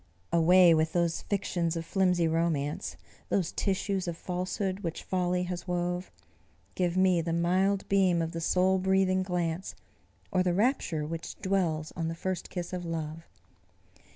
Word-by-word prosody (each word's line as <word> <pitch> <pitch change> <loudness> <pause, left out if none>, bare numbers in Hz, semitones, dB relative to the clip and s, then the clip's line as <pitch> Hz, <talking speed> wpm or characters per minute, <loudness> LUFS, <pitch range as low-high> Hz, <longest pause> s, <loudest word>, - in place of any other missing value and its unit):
Away 175 +1 +6
with 160 0 +1
those 170 -1 +1
fictions 175 -4 -1
of 165 0 -3
flimsy 180 -3 +2
romance! 160 -3 -1 0.3
Those 185 -4 +1
tissues 195 -1 -1
of 170 -1 -3
falsehood 185 +2 -3
which 170 -5 -4
folly 180 -1 0
has 180 0 -5
wove! 180 0 -2 0.6
Give 180 -1 0
me 185 -2 +4
the 165 0 -2
mild 185 +4 +1
beam 190 -3 +3
of 165 0 -1
the 165 -1 -4
soul 185 +3 +2
breathing 190 0 +2
glance, 180 -1 -2 0.6
Or 185 - +2
the 180 -1 +1
rapture 200 - +1
which 165 +1 -5
dwells 175 -6 0
on 165 -2 -2
the 165 - -3
first 185 +2 -3
kiss 175 -1 -5
of 180 -1 -3
love. 165 -1 -5
180 Hz, 155 wpm, -29 LUFS, 165-185 Hz, 0.6 s, Away